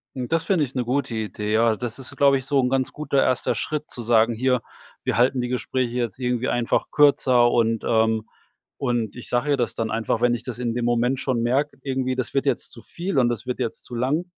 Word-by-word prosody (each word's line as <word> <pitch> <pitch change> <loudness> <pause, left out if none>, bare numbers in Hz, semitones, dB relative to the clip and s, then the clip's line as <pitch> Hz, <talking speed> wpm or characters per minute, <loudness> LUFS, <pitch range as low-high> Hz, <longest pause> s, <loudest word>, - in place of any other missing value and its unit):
Das 135 +6 -1
finde 175 -7 +2
ich 135 - -14
'ne 125 - 0
gute 125 0 -1
Idee. 105 -1 -3
Ja, 115 0 +4
das 120 +1 -5
ist, 130 - -8
glaube 140 -1 +5
ich, 130 - -6
so 140 0 +2
'n 125 - +2
ganz 130 -1 0
guter 145 -2 0
erster 130 -1 +1
Schritt 150 0 -3
zu 120 - -6
sagen: 115 0 +3
„Hier, 125 +1 +1 0.4
wir - - 0
halten 125 +2 +3
die 125 - -1
Gespräche 125 -1 -2
jetzt 120 +1 -2
irgendwie 125 0 -1
einfach 120 -1 0
kürzer“, 130 -4 +4
und, 115 -2 +1
ähm, 110 -1 +2 0.5
und 120 -5 -1
ich 120 - -7
sage 125 +4 +1
ihr 140 - +3
das 120 -2 -1
dann 115 -1 -2
einfach, 110 0 -1
wenn 120 +1 +3
ich 120 -1 -3
das 125 0 -6
in 120 -2 -1
dem 120 - -2
Moment 120 +2 +1
schon 130 -3 0
merke, 135 +5 0
irgendwie, 130 -1 -1
das 130 - -3
wird 135 0 +1
jetzt 135 -4 -1
zu 115 - -10
viel 175 +4 -4
und 120 -2 +3
das 120 0 -3
wird 125 - -3
jetzt 115 -3 -3
zu 120 - -7
lang 135 +8 0
125 Hz, 240 wpm, -23 LUFS, 115-135 Hz, 0.5 s, glaube